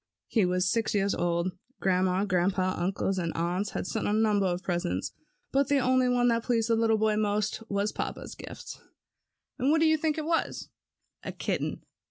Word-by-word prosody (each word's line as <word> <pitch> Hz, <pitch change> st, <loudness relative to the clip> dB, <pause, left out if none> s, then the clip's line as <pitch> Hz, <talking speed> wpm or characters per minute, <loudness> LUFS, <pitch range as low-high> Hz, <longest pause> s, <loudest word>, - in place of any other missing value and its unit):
He 215 Hz, -6 st, +2 dB
was 180 Hz, 0 st, +1 dB
six 225 Hz, +2 st, 0 dB
years 200 Hz, 0 st, +2 dB
old. 170 Hz, +1 st, 0 dB, 0.3 s
Grandma, 185 Hz, +1 st, +2 dB
Grandpa, 185 Hz, 0 st, +1 dB
uncles, 190 Hz, +1 st, -1 dB
and 170 Hz, -2 st, -1 dB
aunts 180 Hz, +5 st, -1 dB
had -, -, -3 dB
sent 220 Hz, +2 st, -2 dB
a 205 Hz, -, +1 dB
number 210 Hz, -3 st, +3 dB
of 180 Hz, 0 st, -2 dB
presents, 170 Hz, -, -2 dB, 0.4 s
but 275 Hz, 0 st, +2 dB
the 285 Hz, -1 st, +3 dB
one 250 Hz, -1 st, +3 dB
that 230 Hz, 0 st, +2 dB
pleased 230 Hz, -1 st, 0 dB
the 230 Hz, -, +4 dB
little 225 Hz, -1 st, +3 dB
boy 215 Hz, 0 st, +2 dB
most 210 Hz, +1 st, 0 dB
was 200 Hz, +1 st, 0 dB
papa's -, -, -5 dB
gift. -, -, -9 dB, 0.8 s
And 260 Hz, -, +2 dB
what 320 Hz, +2 st, +4 dB
do 325 Hz, -, +4 dB
you 315 Hz, 0 st, +4 dB
think 310 Hz, 0 st, 0 dB
it 310 Hz, -, -2 dB
was? 330 Hz, 0 st, -1 dB, 0.5 s
A -, -, -5 dB
kitten. -, -, -3 dB
205 Hz, 185 wpm, -28 LUFS, 185-235 Hz, 0.8 s, the